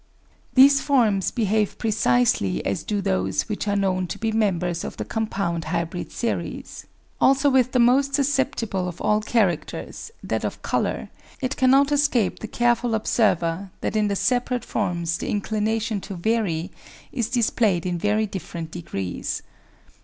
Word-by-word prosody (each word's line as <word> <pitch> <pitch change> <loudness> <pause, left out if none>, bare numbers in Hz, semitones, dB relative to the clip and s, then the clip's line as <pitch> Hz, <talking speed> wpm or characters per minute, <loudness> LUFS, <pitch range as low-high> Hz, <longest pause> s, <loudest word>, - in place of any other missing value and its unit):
These 275 +1 +7
forms 225 -9 +2
behave 215 -3 0
precisely 125 - +1
as 100 - -1
do 205 -1 -2
those 95 - 0
which 210 -1 -3
are 205 - +1
known 185 -2 0
to - - -5
be 225 -1 -1
members 180 -6 0
of - - -6
the - - -4
compound 195 -7 -2
hybrid 170 +2 -3
series. 235 - -4 0.3
Also 275 +1 +4
with 255 -1 +3
the - - +1
most 265 +3 +4
susceptible 265 -9 0
of 175 - -7
all 210 0 +2
characters, 210 - -1
that - - -2
of - - -4
colour, - - -1 0.3
it 255 -2 -2
cannot 270 +2 +4
escape 285 -8 +2
the 220 - -6
careful 240 0 +1
observer 195 -5 +1
that - - -2
in 210 -1 +2
the 200 - 0
separate 245 +2 0
forms 170 -4 -1
the - - -4
inclina 215 +2 0
tion 215 -2 -3
to 195 - -7
vary 180 -4 -1 0.4
is 235 -3 -2
displayed 220 -7 +1
in 175 -1 -1
very 210 +3 +1
different 170 -5 -6
degrees. 95 - -4
210 Hz, 155 wpm, -23 LUFS, 180-240 Hz, 0.4 s, These